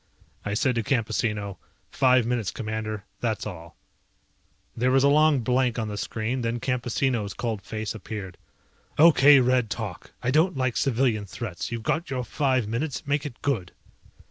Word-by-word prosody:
I 105 0 -2
said 130 +4 +2
to 115 - 0
Campesino, 105 -4 -1 0.3
"Five 130 -3 +4
minutes, 120 -4 -1
Commander. 110 -2 -4 0.2
That's 110 -3 -2
all." 85 -5 -8 1.0
There 125 +2 +1
was 135 +1 +4
a - - +6
long 150 -2 +4
blank 125 0 +1
on 110 -2 -2
the 105 - -4
screen, 115 +5 -2
then 115 0 -1
Campesino's 120 -4 -1
cold 115 -4 -3
face 110 +2 -4
appeared. 100 -4 -7 0.6
"Okay, 145 -3 +7
Red, 125 -2 +2
talk. 105 -6 -5
I 125 - +1
don't 160 +3 +3
like 130 -2 0
civilian 120 -5 +1
threats. 95 -3 -5
You've 115 -1 -4
got 165 +8 -1
your 130 -2 -2
five 130 -1 0
minutes, 130 +6 -3
make 145 +1 0
it 125 -4 -13
good." 115 -11 -1
120 Hz, 160 wpm, -26 LUFS, 110-130 Hz, 1.0 s, Okay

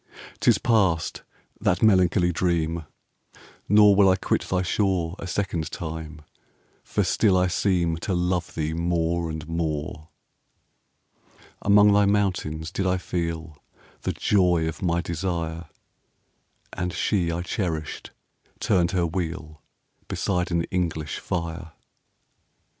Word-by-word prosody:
'Tis - - +4
past, 95 -8 +1 0.4
that 90 +3 +1
melancholy 90 -3 +4
dream! 85 -2 0 0.5
5 - - -21 0.3
Nor 105 0 +7
will 100 -1 +6
I 95 - +5
quit 95 - 0
thy 90 0 +1
shore 90 -3 0
A 95 - -6
second 85 -4 -2
time; 80 -2 -7 0.6
for - - 0
still 100 -4 +3
I 90 - +3
seem 90 -2 +1
To 95 +3 -2
love 90 0 -1
thee 80 0 -1
more 85 0 0
and 80 -1 -6
more. 80 -2 -3 1.5
Among 105 0 +6
thy 100 0 +4
mountains 90 -6 0
did 95 - -1
I 90 0 +2
feel 85 -4 -4 0.4
The - - -2
joy 90 -5 +2
of 80 - -5
my 85 -2 +1
desire; 85 -1 -3 1.1
10 - - -3
And 90 - -3
she 90 -5 0
I 85 +1 -3
cherished 80 -5 -3 0.5
turned 85 -1 +2
her 90 -2 +2
wheel 80 -3 -4 0.5
Beside 90 -2 -1
an 85 -1 +1
English 80 -4 -2
fire. 85 -2 -4
85 Hz, 125 wpm, -25 LUFS, 80-95 Hz, 1.5 s, Nor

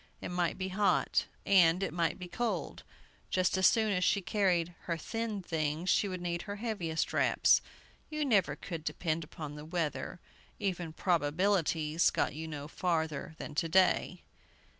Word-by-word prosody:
It - - -6
might 175 -1 0
be 190 0 -3
hot, 200 +2 +2 0.2
and 180 -1 +5
it - - -2
might 170 0 0
be 180 -2 -7
cold. 200 - -3 0.5
Just 185 0 +2
as 190 0 +5
soon 220 -3 +3
as 180 -1 0
she 200 - +3
carried 175 -2 +1
her 170 -1 -1
thin 220 +3 -3
things, 160 +1 -1
she 205 - +3
would 185 -2 -5
need 170 -1 -2
her 205 -1 -6
heaviest 200 -8 -2
wraps. - - +4 0.5
You 305 -1 -1
never 200 - +3
could 165 -1 -6
depend 165 0 -2
upon 150 -1 -8
the 150 0 -8
weather. 165 +1 -3 0.4
Even 175 -4 -2
"Probabilities" 165 -1 +1
got - - 0
you 160 +2 -6
no 150 -2 -6
farther 160 -3 -2
than - - -7
to 165 +2 0
day. 185 +2 +3
175 Hz, 160 wpm, -32 LUFS, 160-195 Hz, 0.5 s, and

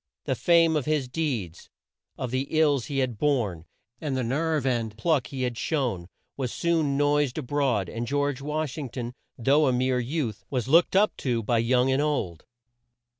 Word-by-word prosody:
The - - 0
fame 165 -2 +4
of 150 - 0
his 150 -4 0
deeds, 125 - -3 0.5
of 125 - -4
the 130 +2 -1
ills 145 -7 +2
he 140 - -3
had 125 -5 -1
borne, 110 - 0 0.3
and 140 -4 -2
the 130 - 0
nerve 150 +4 0
and 115 -4 -1
pluck 145 +1 +1
he 135 -3 -4
had 120 -2 -2
shown, 120 - -1 0.3
was 130 -4 -3
soon 160 -5 +1
noised 145 -2 +2
a 155 - -2
broad, 125 -7 0
and 115 +5 -4
George 145 0 -1
Wash 150 0 -3
ing 140 -4 -5
ton, 120 0 -5 0.2
though 140 +5 +3
a - - +3
mere 125 0 +1
youth, 120 -4 -3
was 125 -3 -2
looked 170 +6 +4
up 210 +2 +4
to 120 -4 -1
by 115 +2 +1
young 125 +3 +2
and 135 +2 +2
old. 105 - -2
135 Hz, 185 wpm, -26 LUFS, 120-150 Hz, 0.5 s, fame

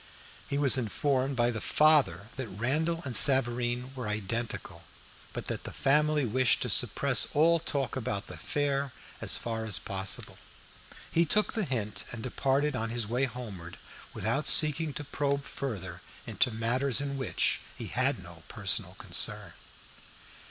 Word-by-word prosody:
He 140 - -1
was 140 -2 +4
informed 130 +3 0
by 120 -1 +2
the 110 -2 -5
father 150 -8 +4
that 130 -2 -5
Randall 150 - -1
and 130 -3 0
Savareen 125 -1 +3
were 125 -4 -5
identical, 110 +3 -3 0.5
but - - -6
that - - -4
the - - -7
family 150 +1 +2
wished 125 +2 +2
to - - -3
suppress - - +3
all 165 +3 +4
talk 140 -5 -2
about 110 -6 -3
the - - -10
affair 140 -2 -2 0.3
as - - +1
far 115 -1 -4
as 105 -6 +1
possible. 95 +4 -2 0.7
He 170 - +3
took 210 +6 +2
the 220 -4 -1
hint, 110 -7 -3
and 115 -1 -7
departed 135 +3 0
on 115 -2 -2
his 120 -1 -2
way 125 +5 0
homeward, 105 -9 -8 0.3
without 140 +1 -1
seeking 155 0 +6
to 150 - -4
probe 140 0 -1
further 95 -11 -6 0.2
into 125 - +1
matters 120 +4 0
in 140 0 -3
which 135 -1 0 0.2
he - - -6
had - - -1
no - - -12
personal - - -2
concern. - - -1
130 Hz, 150 wpm, -29 LUFS, 115-145 Hz, 0.7 s, seeking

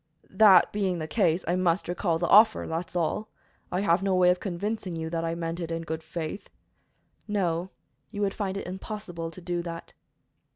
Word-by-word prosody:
"That 200 -5 +6
being 195 -3 0
the 160 - -3
case, 175 -3 +1
I 175 - +2
must 185 0 +1
recall 175 -1 0
the 175 - -1
offer, 215 +4 +6
that's 165 +2 -4
all. 175 +5 -1 0.4
I 180 - 0
have 175 -2 +3
no 195 -1 +1
way 180 -1 +5
of 180 - -1
convincing 200 -1 -3
you 160 0 -4
that 165 -1 -1
I 165 0 -1
meant 165 0 -4
it 170 -2 -4
in 165 0 -3
good 160 0 -4
faith." 160 +3 -6 0.8
"No, 180 -4 -1 0.4
you 205 -2 -5
would 200 -1 +1
find 195 -2 -3
it - - -5
impossible 180 -3 -6
to 185 - -11
do 175 0 -2
that." 170 -1 -7
175 Hz, 195 wpm, -27 LUFS, 165-195 Hz, 0.8 s, That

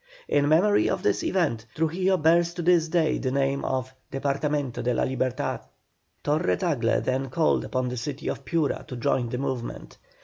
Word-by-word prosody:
In 145 0 +2
memory 195 +7 +4
of - - -2
this 105 - +1
event, 140 -12 0
Trujillo 180 +4 +1
bears 170 +2 +3
to 175 - -3
this 170 -1 +4
day 160 -1 +1
the 130 - -1
name 135 +1 0
of 130 0 -2 0.2
"Departamento 140 -1 -1
de 125 0 +1
la - - +1
Libertad." 130 +1 -1 0.6
Torre 155 +4 +1
Tagle 145 -11 +1
then 130 +1 -1
called 155 +5 +2
upon 130 -1 -2
the 125 - -4
city 140 +4 -5
of - - -3
Piura 165 -4 0
to 125 - -6
join 120 0 0
the 125 - -3
movement. 130 -3 -5
140 Hz, 175 wpm, -26 LUFS, 130-165 Hz, 0.6 s, memory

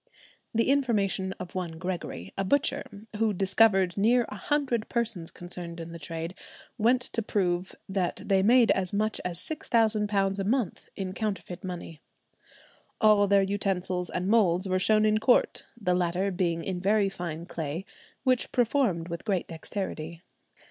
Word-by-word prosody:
The 230 +3 +2
information 205 -8 +1
of 185 -2 -9
one 180 -3 -3
Gregory, 165 - -5
a 195 - -1
butcher, 210 -2 0
who 220 -1 +2
"discovered" 195 -1 +3
near 235 +4 +4
a - - -7
hundred 245 0 -1
persons 220 -8 -1
concerned 175 -1 -7
in 165 0 -7
the 170 - -8
trade, 165 +2 -5 0.5
went 245 +4 +4
to 230 - -1
prove 185 -4 -1
that 190 -2 -1
they 195 -1 +3
made 235 +3 +5
as 185 0 0
much 215 +2 0
as 175 -1 -3
£6,000 210 -5 +1
a - - 0
month 225 -1 -1
in 190 -1 -4
counterfeit 195 -3 -4
money. 175 -4 -7 1.0
"All 210 -2 +5
their 200 0 +4
utensils 190 -2 -1
and 180 +1 -2
moulds 195 -4 +3
were 185 0 +1
shown 215 +3 +4
in 215 0 +3
court, 245 +3 +2
the 180 -4 +1
latter 180 +2 0
being 170 -2 -1
in 185 0 -3
very 205 +1 +3
fine 170 -4 -5
clay, 165 +2 -4 0.4
which 255 -2 +1
performed 235 - +1
with 170 -1 -5
great 195 -5 0
dexterity." 165 -1 -5
195 Hz, 155 wpm, -28 LUFS, 175-215 Hz, 1.0 s, made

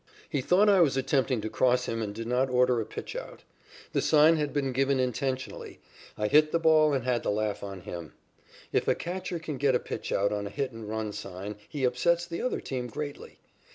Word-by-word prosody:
He 140 - -1
thought 185 +10 +4
I 195 -3 +6
was 140 -6 +3
attempting 130 -2 +1
to 110 - -3
cross 125 0 +2
him 115 0 -2
and 105 -2 -3
did 115 +2 -6
not 125 +3 +1
order 125 -1 +3
a - - -4
pitchout. - - -7 0.5
The - - +2
sign 155 +1 +5
had 150 -2 -1
been 140 -2 -1
given 135 +1 +1
intentionally. 130 +1 -3 0.4
I 105 - -1
hit 155 +6 +5
the - - +3
ball 160 -2 +5
and 130 - -1
had 125 -1 0
the - - -2
laugh 105 0 -1
on 100 -2 -7
him. 85 -4 -8 0.6
If - - +1
a - - +3
catcher 180 0 -4
can 160 -3 -5
get 135 -1 +2
a - - +3
pitchout 100 +1 -1
on 105 -1 -2
a - - -6
hit 135 +4 -3
and 115 -2 -8
run 110 -1 -3
sign 100 +1 -6
he 145 -3 -4
upsets 170 +8 +2
the 170 -1 -5
other 255 - -1
team 125 -2 -4
greatly. 145 +4 -7
130 Hz, 215 wpm, -28 LUFS, 110-150 Hz, 0.6 s, I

